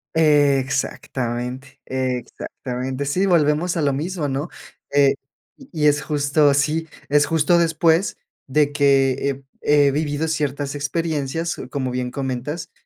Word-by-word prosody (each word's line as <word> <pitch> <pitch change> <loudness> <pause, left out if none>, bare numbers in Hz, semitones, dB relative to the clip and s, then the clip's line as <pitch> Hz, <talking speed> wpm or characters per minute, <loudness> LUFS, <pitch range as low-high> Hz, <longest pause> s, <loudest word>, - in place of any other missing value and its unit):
Exactamente, 135 -4 0
exactamente. 130 +1 -4
Sí, 180 +8 +1
volvemos 170 0 +2
a - - 0
lo 140 -1 +2
mismo, 160 +2 -2
¿no? 140 +4 -3 0.4
Eh, 140 -1 +4 0.4
y 275 - -16 0.2
-y - - +7
es 145 -1 +3
justo 145 0 +2
sí, 155 +3 0 0.2
es 145 0 +4
justo 165 +2 +3
después 165 +2 +2 0.3
de 145 +2 +2
que, 140 -2 +3 0.2
eh, 135 0 -5 0.2
he 145 -1 +4
vivido 145 +2 -1
ciertas 145 -3 -2
experiencias, 160 +1 -2
como 130 -3 -2
bien 125 0 -2
comentas 135 +4 -4
145 Hz, 125 wpm, -21 LUFS, 135-155 Hz, 0.4 s, y